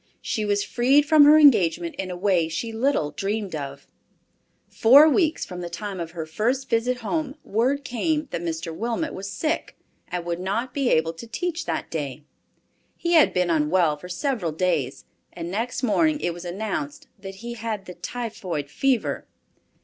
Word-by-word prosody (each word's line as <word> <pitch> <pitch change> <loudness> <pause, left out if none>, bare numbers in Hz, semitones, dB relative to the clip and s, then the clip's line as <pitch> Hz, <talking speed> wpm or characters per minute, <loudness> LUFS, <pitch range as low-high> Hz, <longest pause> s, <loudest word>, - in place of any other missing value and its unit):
She 215 - -1
was 205 0 +1
freed 270 +4 +3
from 305 -1 +7
her 300 +1 +8
engagement 175 - +4
in 190 -1 -3
a 180 - -4
way 180 -4 +2
she 225 +8 -3
little 225 - +1
dreamed 200 0 -3
of. 140 -1 -6 0.8
Four 275 +7 +7
weeks 320 0 +2
from 180 0 -7
the 175 - -5
time 195 +2 -5
of 165 -1 -4
her 160 - -3
first 245 +11 -1
visit 245 +2 +1
home, 285 +4 -2
word 255 +7 0
came 300 +4 -1
that - - -3
Mr. 165 -1 -4
Wilmot 235 - -2
was 195 +1 -6
sick 310 +10 -2 0.3
and 175 -1 -4
would 170 0 -2
not 220 +7 -2
be 275 -3 +1
able 160 +1 +2
to 165 +8 -10
teach 340 +8 -3
that - - -3
day. 150 -2 -4 0.7
He 340 - -2
had 320 -3 +6
been 180 -1 +1
unwell 160 0 +2
for 180 +5 -11
several 185 - -1
days, 155 -5 -1 0.3
and 170 0 -6
next 230 +6 -3
morning 300 +6 +2
it 175 - -1
was 175 +1 -9
announced 175 -6 -4
that 195 0 -8
he 240 - -4
had 220 -3 -4
the 180 - -8
typhoid 205 - -5
fever. 265 - 0
205 Hz, 175 wpm, -24 LUFS, 170-255 Hz, 0.8 s, her